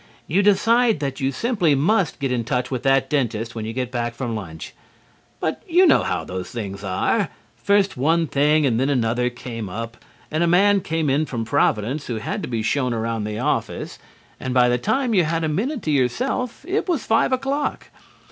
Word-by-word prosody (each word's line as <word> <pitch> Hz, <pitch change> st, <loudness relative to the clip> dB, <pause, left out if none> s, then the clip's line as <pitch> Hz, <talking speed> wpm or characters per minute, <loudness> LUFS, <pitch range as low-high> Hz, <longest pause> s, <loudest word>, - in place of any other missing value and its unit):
You 180 Hz, +6 st, +2 dB
decide 225 Hz, +2 st, +3 dB
that 140 Hz, -2 st, -3 dB
you 135 Hz, -1 st, 0 dB
simply 180 Hz, -, +1 dB
must 175 Hz, +4 st, +1 dB
get 135 Hz, -2 st, -1 dB
in 120 Hz, -2 st, 0 dB
touch 125 Hz, +3 st, -2 dB
with 130 Hz, -2 st, -2 dB
that 135 Hz, 0 st, +3 dB
dentist 115 Hz, -5 st, -1 dB
when 110 Hz, -2 st, -5 dB
you 110 Hz, -, -4 dB
get 125 Hz, 0 st, -3 dB
back 120 Hz, -1 st, -2 dB
from 120 Hz, -2 st, -3 dB
lunch. 85 Hz, -7 st, -7 dB, 0.7 s
But 160 Hz, -, -2 dB
you 360 Hz, +2 st, +5 dB
know 325 Hz, -, +5 dB
how 90 Hz, -3 st, -2 dB
those 90 Hz, +2 st, -6 dB
things 100 Hz, -4 st, -6 dB
are. 95 Hz, -2 st, 0 dB, 0.3 s
First 200 Hz, -4 st, +1 dB
one 165 Hz, +5 st, +2 dB
thing 150 Hz, +1 st, +2 dB
and 120 Hz, -4 st, +1 dB
then 135 Hz, +2 st, +1 dB
another 125 Hz, -2 st, +1 dB
came 115 Hz, -4 st, -7 dB
up, 115 Hz, +4 st, -7 dB, 0.3 s
and 155 Hz, +2 st, +1 dB
a -, -, +2 dB
man 195 Hz, +3 st, +4 dB
came 160 Hz, -2 st, -1 dB
in 145 Hz, +3 st, +1 dB
from 115 Hz, -3 st, -3 dB
Providence 115 Hz, +7 st, 0 dB
who 120 Hz, -, -3 dB
had 110 Hz, -, -3 dB
to -, -, -5 dB
be 115 Hz, -3 st, -2 dB
shown 125 Hz, 0 st, 0 dB
around 115 Hz, -1 st, -2 dB
the 105 Hz, 0 st, -4 dB
office, -, -, -2 dB, 0.4 s
and 130 Hz, -1 st, -3 dB
by 125 Hz, -1 st, +5 dB
the 120 Hz, 0 st, +1 dB
time 250 Hz, -, 0 dB
you 185 Hz, -4 st, +4 dB
had 165 Hz, +1 st, -1 dB
a -, -, +1 dB
minute 235 Hz, -, -2 dB
to 155 Hz, -, -1 dB
yourself 235 Hz, -, -1 dB
it 390 Hz, +1 st, -1 dB
was 325 Hz, -8 st, 0 dB
five 225 Hz, +3 st, +2 dB
o'clock. 275 Hz, +3 st, -2 dB
135 Hz, 205 wpm, -22 LUFS, 115-185 Hz, 0.7 s, you